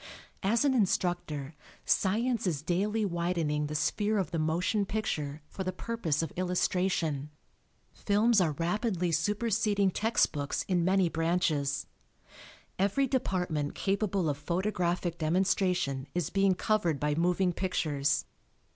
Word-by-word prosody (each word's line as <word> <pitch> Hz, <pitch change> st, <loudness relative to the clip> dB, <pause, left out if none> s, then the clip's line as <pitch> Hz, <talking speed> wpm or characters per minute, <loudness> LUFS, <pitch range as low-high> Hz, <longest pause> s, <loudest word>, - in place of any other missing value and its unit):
As 225 Hz, +7 st, +2 dB
an 275 Hz, -, +3 dB
instructor, 175 Hz, -, 0 dB, 0.3 s
science 225 Hz, +3 st, +1 dB
is 155 Hz, -5 st, -1 dB
daily 205 Hz, +6 st, 0 dB
widening 170 Hz, -4 st, -1 dB
the 150 Hz, -, -5 dB
sphere 210 Hz, +7 st, +1 dB
of 190 Hz, -2 st, -1 dB
the 165 Hz, -, -1 dB
motion 175 Hz, +7 st, +1 dB
picture 155 Hz, -8 st, -3 dB
for 190 Hz, -, -5 dB
the 185 Hz, -, -2 dB
purpose 180 Hz, -7 st, -2 dB
of 160 Hz, -, -4 dB
illustration. 180 Hz, -5 st, 0 dB, 0.6 s
Films 210 Hz, +1 st, +3 dB
are 160 Hz, -4 st, +1 dB
rapidly 180 Hz, -, -1 dB
superseding 205 Hz, +2 st, +1 dB
text 220 Hz, +5 st, +2 dB
books 145 Hz, -2 st, -2 dB
in 180 Hz, -3 st, +1 dB
many 190 Hz, 0 st, +3 dB
branches. 160 Hz, -4 st, 0 dB, 0.9 s
Every 200 Hz, +8 st, +2 dB
department 180 Hz, -, -1 dB
capable 195 Hz, -3 st, 0 dB
of 145 Hz, -1 st, -1 dB
photographic 175 Hz, +1 st, -1 dB
demonstration 180 Hz, -4 st, +1 dB
is 175 Hz, -5 st, -1 dB
being 195 Hz, -1 st, +3 dB
covered 175 Hz, -7 st, +1 dB
by 150 Hz, 0 st, 0 dB
moving 180 Hz, +3 st, +1 dB
pictures. 150 Hz, -6 st, 0 dB
180 Hz, 125 wpm, -30 LUFS, 160-200 Hz, 0.9 s, an